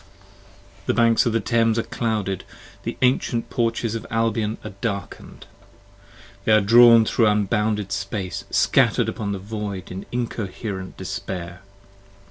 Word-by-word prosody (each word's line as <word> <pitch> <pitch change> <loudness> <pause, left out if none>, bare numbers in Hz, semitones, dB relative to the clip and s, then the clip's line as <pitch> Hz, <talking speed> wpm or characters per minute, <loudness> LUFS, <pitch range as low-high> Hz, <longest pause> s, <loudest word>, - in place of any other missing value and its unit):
I - - -24
B - - -27
p. 100 0 -26
5 100 - -25
THE - - +2
banks 115 +1 +4
of 115 - 0
the 115 - +2
Thames 115 +1 +1
are 115 - +1
clouded! 105 -5 -2 0.4
the - - -5
ancient 125 -2 +1
porches 115 -1 0
of 115 - -4
Albion 115 -1 0
are 110 - -7
Darken'd! 100 -4 -5 1.0
they - - +1
are 110 - +7
drawn 115 +2 +7
thro' 115 +1 +2
unbounded 105 0 0
space, 100 -1 -3
scatter'd - - +3
upon 105 -2 -4
The 100 - -2
Void 100 -2 -6
in 95 +2 -7
incoher(er)ent 105 -5 -4
despair! 90 -1 -6
105 Hz, 150 wpm, -23 LUFS, 100-115 Hz, 1.0 s, are